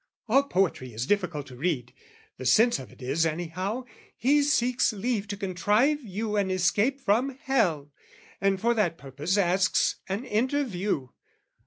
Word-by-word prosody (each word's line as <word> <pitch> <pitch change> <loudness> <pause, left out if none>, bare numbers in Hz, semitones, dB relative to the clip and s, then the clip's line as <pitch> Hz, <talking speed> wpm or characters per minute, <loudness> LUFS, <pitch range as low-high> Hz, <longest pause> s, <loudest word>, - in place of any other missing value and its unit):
"All 260 +5 +5
poetry 185 - -1
is 115 +3 -2
difficult 180 -6 -1
to 130 - -12
read, 130 -4 -2 0.2
" - - -30
The 130 - -6
sense 225 - +4
of 130 - -10
it - - -14
is, 150 +6 +1
anyhow, 175 +8 -2 0.3
he 285 +4 +3
seeks 250 -4 +2
"Leave 215 0 -2
to 200 -1 -5
contrive 205 - +1
you 210 +1 -3
an 200 -2 +1
escape 200 +9 +1
from 255 +2 +1
hell, 170 - +1 0.5
"And 195 -1 +2
for 235 +4 +2
that 185 -8 0
purpose 145 +8 -2
asks 185 0 +2
an 200 +7 -3
interview. 210 - -1
195 Hz, 155 wpm, -27 LUFS, 165-235 Hz, 0.5 s, All